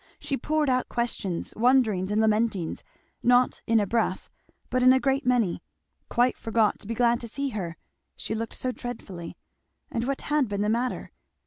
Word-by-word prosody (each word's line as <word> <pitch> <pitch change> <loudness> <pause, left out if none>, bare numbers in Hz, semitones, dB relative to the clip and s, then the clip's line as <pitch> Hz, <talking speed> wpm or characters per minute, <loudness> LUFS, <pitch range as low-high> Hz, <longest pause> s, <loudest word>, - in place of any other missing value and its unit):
She 275 - -2
poured 305 +3 0
out 255 -1 +1
questions, 220 -7 -2
wonderings 220 -6 +3
and 210 +1 +1
lamentings, 215 -5 +1 0.4
not 245 +1 +3
"in 230 0 +4
a 205 - +1
breath" 215 -2 -1 0.4
but 255 - +1
in 255 +1 +7
a 260 - +4
great 270 -1 0
many; 235 -8 +2 0.5
quite 245 +1 +2
forgot 225 -1 +1
to - - -11
be 230 - -3
glad 235 0 +3
to 235 - -6
see 275 +5 -2
her, 180 -8 -5 0.4
she - - -4
looked 225 +1 -4
so 255 - -2
dreadfully; 200 -9 -7 0.5
and 235 +1 -2
"what 275 0 -1
had 295 -3 +1
been 200 -1 -2
the 210 - +1
matter?" 240 +3 -1
235 Hz, 180 wpm, -26 LUFS, 210-255 Hz, 0.5 s, in